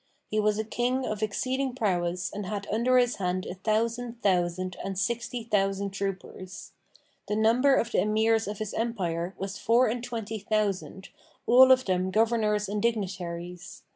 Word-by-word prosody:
He 215 Hz, -, -1 dB
was 210 Hz, 0 st, +2 dB
a 220 Hz, -, 0 dB
King 245 Hz, +4 st, -1 dB
of 215 Hz, -2 st, -3 dB
exceeding 255 Hz, +5 st, -1 dB
prowess 180 Hz, -5 st, -1 dB
and 205 Hz, -1 st, -5 dB
had 200 Hz, 0 st, -4 dB
under 240 Hz, +4 st, +3 dB
his 245 Hz, -1 st, +2 dB
hand 185 Hz, -1 st, -1 dB
a -, -, -5 dB
thousand 230 Hz, +4 st, -1 dB
thousand 185 Hz, -1 st, +1 dB
and 195 Hz, -1 st, -4 dB
sixty 235 Hz, +5 st, -2 dB
thousand 200 Hz, -2 st, 0 dB
troopers. 190 Hz, -1 st, -6 dB, 0.6 s
The 210 Hz, -, -1 dB
number 240 Hz, +6 st, +4 dB
of 230 Hz, -2 st, 0 dB
the -, -, +2 dB
Emirs 220 Hz, +1 st, +2 dB
of 205 Hz, 0 st, -4 dB
his 215 Hz, -1 st, -4 dB
Empire 185 Hz, -6 st, -2 dB
was 195 Hz, 0 st, -5 dB
four 235 Hz, +3 st, +4 dB
and 235 Hz, +1 st, -2 dB
twenty 225 Hz, -3 st, -4 dB
thousand, 200 Hz, -2 st, -2 dB, 0.4 s
all 260 Hz, +2 st, +7 dB
of 255 Hz, 0 st, +5 dB
them 185 Hz, -1 st, 0 dB
Governors 215 Hz, 0 st, +1 dB
and 205 Hz, +1 st, -2 dB
Dignitaries. 180 Hz, -4 st, -3 dB
210 Hz, 165 wpm, -27 LUFS, 190-230 Hz, 0.6 s, all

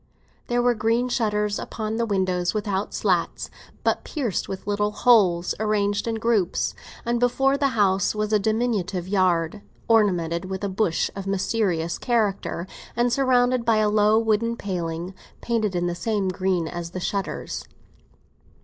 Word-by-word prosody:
There 240 Hz, 0 st, +1 dB
were 245 Hz, 0 st, +4 dB
green 230 Hz, +3 st, +1 dB
shutters 210 Hz, -3 st, 0 dB
upon 220 Hz, 0 st, -4 dB
the 230 Hz, 0 st, 0 dB
windows, 185 Hz, -3 st, 0 dB
without 205 Hz, -1 st, -1 dB
slats, 180 Hz, -5 st, -1 dB, 0.3 s
but -, -, +1 dB
pierced 255 Hz, -, -2 dB
with 190 Hz, -, -6 dB
little 205 Hz, 0 st, 0 dB
holes, 200 Hz, -6 st, +3 dB
arranged 205 Hz, -1 st, 0 dB
in 225 Hz, -, 0 dB
groups; 220 Hz, -5 st, +1 dB, 0.3 s
and 235 Hz, 0 st, 0 dB
before 270 Hz, +3 st, +2 dB
the 280 Hz, 0 st, +2 dB
house 195 Hz, -1 st, +2 dB
was 215 Hz, 0 st, -1 dB
a 210 Hz, -, +5 dB
diminutive 205 Hz, -4 st, -1 dB
yard, 185 Hz, -1 st, +1 dB, 0.3 s
ornamented 180 Hz, -6 st, +2 dB
with 190 Hz, +1 st, -5 dB
a 200 Hz, -, 0 dB
bush 190 Hz, -3 st, 0 dB
of 195 Hz, 0 st, -6 dB
mysterious 190 Hz, -4 st, 0 dB
character, 210 Hz, -7 st, 0 dB, 0.3 s
and 240 Hz, 0 st, +2 dB
surrounded 255 Hz, -2 st, +3 dB
by 225 Hz, -1 st, +3 dB
a 215 Hz, -1 st, +3 dB
low 210 Hz, +1 st, +4 dB
wooden 225 Hz, +1 st, +1 dB
paling, 175 Hz, -2 st, -4 dB, 0.3 s
painted 220 Hz, -5 st, -1 dB
in 175 Hz, 0 st, 0 dB
the 175 Hz, -, -1 dB
same 195 Hz, +2 st, -1 dB
green 185 Hz, -2 st, 0 dB
as 170 Hz, 0 st, -5 dB
the 185 Hz, -, -6 dB
shutters. 195 Hz, +2 st, -3 dB
205 Hz, 150 wpm, -24 LUFS, 185-230 Hz, 0.3 s, a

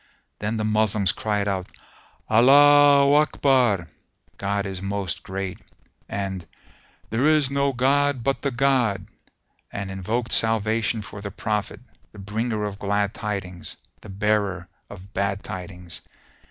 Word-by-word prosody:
Then 105 Hz, +2 st, -2 dB
the 110 Hz, -, -1 dB
Moslems 105 Hz, -2 st, +2 dB
cried 105 Hz, -2 st, -1 dB
out, 95 Hz, -2 st, -2 dB, 0.6 s
"Allaho 140 Hz, +4 st, +6 dB
Akbar!" 125 Hz, -, +2 dB, 0.5 s
(God 100 Hz, 0 st, -1 dB
is 95 Hz, -2 st, -5 dB
most 100 Hz, -3 st, -3 dB
Great) 95 Hz, -1 st, -5 dB, 0.5 s
and 95 Hz, -3 st, -4 dB, 0.6 s
"There 120 Hz, +6 st, +2 dB
is 155 Hz, -3 st, +3 dB
no 140 Hz, 0 st, +1 dB
god 135 Hz, 0 st, +1 dB
but 135 Hz, +2 st, 0 dB
the 140 Hz, -, 0 dB
God!", 120 Hz, -7 st, +1 dB, 0.7 s
and 100 Hz, -1 st, -5 dB
invoked 110 Hz, +5 st, -2 dB
salvation 110 Hz, 0 st, +1 dB
for 100 Hz, 0 st, -9 dB
the 100 Hz, -, -5 dB
Prophet, 105 Hz, +1 st, -3 dB, 0.3 s
the -, -, -14 dB
Bringer 105 Hz, +2 st, -3 dB
of 100 Hz, -1 st, -4 dB
Glad 100 Hz, 0 st, 0 dB
Tidings, 95 Hz, -4 st, -5 dB, 0.2 s
the 105 Hz, -, -12 dB
Bearer 100 Hz, -2 st, 0 dB, 0.2 s
of 100 Hz, +1 st, -12 dB
Bad 100 Hz, 0 st, -1 dB
Tidings. 90 Hz, -1 st, -6 dB
105 Hz, 125 wpm, -24 LUFS, 100-120 Hz, 0.7 s, Allaho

